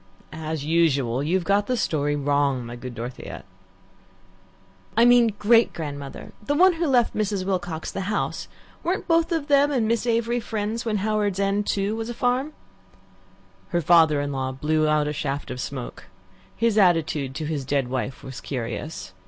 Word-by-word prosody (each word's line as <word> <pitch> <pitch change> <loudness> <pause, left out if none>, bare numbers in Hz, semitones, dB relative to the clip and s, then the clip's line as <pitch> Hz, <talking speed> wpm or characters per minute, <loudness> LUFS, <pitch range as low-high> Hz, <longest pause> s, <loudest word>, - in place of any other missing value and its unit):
"As 155 -2 -4
usual, 140 -7 +2
you've 175 +5 0
got 200 +2 +1
the 250 - 0
story 145 -7 0
wrong, 140 -3 +1
my 120 +1 -7
good 125 0 -8
Dorothea." 120 +2 -7 1.5
"I 230 - +6
mean 240 -3 +5
great 230 +2 +4
grandmother 145 -3 -7
the 290 +7 0
one 370 +4 +6
who 330 0 -1
left 250 -4 +2
Mrs. 205 -3 -1
Wilcox 175 -4 -3
the 195 - -4
house. 210 - -2 0.3
Weren't 360 +3 -2
both 330 +1 +2
of 325 -4 0
them 285 0 +4
and 240 -6 +1
Miss 230 +1 0
Avery 235 +1 +1
friends 220 +1 -3
when 215 -2 0
Howards 210 -3 0
End, 200 +1 0
too, 200 +2 0
was 225 +1 -4
a 240 - -5
farm?" 255 +6 0 1.2
Her 175 - 0
father 160 -2 +5
in 145 0 -3
law 130 -1 -2
blew 155 +3 0
out 150 -1 +2
a 150 - -2
shaft 140 -1 -3
of 125 - -4
smoke. 130 -2 -6 0.5
His 230 -2 +2
attitude 155 -7 +2
to 155 +1 -3
his 150 -3 -2
dead 140 -1 0
wife 130 +1 -4
was 130 -1 -8
curious. 120 -1 -5
170 Hz, 170 wpm, -24 LUFS, 145-225 Hz, 1.5 s, I